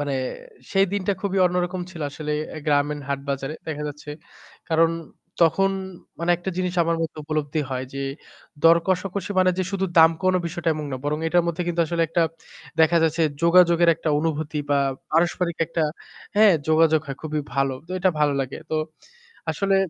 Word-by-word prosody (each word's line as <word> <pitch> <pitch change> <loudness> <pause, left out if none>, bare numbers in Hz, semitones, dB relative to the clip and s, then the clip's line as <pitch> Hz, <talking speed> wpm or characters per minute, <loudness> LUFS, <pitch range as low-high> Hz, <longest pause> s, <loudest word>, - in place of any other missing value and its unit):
মানে 145 -1 -2 0.6
সেই 195 -1 +4
দিনটা 200 0 0
খুবই 195 -1 -1
অন্যরকম 180 +1 -1
ছিল 170 -3 -10
আসলে 150 +1 -4 0.2
অ্যা - - -7
গ্রামীণ 145 0 +1
হাট 140 -1 -1
বাজারে 135 +2 -2
দেখা 150 -1 -3
যাচ্ছে। 150 0 -9 0.6
কারণ 165 0 +4 0.5
তখন 195 +4 +4 0.5
মানে 170 +1 0
একটা 180 +2 -4
জিনিস 180 -1 -1
আমার 165 0 0
মধ্যে 160 -1 -4
উপলব্ধি 155 0 -1
হয় 130 0 -2
যে, 135 - -4 0.6
দর 165 0 +7
কষাকষি 190 +1 -1
মানে 185 0 +5
যে - - +2
শুধু 195 -1 0
দাম 160 0 +8
কমানো 185 -1 +2
বিষয়টা 170 0 -3
এমন 150 -1 -4
না। - - -1
বরং 150 +1 0
এটার 175 +1 +3
মধ্যে 170 +1 -1
কিন্তু 175 -1 0
আসলে 170 +1 0
একটা 170 +1 +2 0.6
দেখা 160 +1 +5
যাচ্ছে 165 +1 +1 0.2
যোগাযোগের 170 0 +5
একটা 165 0 -4
অনুভূতি 155 -1 -2
বা 140 - +4 0.3
পারস্পরিক 170 +1 +1
একটা 165 0 -1 0.5
হ্যাঁ, 210 -1 +7 0.2
যোগাযোগ 160 0 +4
হয় 135 - -5
খুবই 155 -1 -2
ভালো। 135 -1 +1
তো - - -17
এটা 185 +1 +3
ভালো 145 -1 +3
লাগে। 135 0 -4
তো - - -1 0.8
আসলে 195 +5 +1
165 Hz, 175 wpm, -23 LUFS, 150-180 Hz, 0.8 s, দাম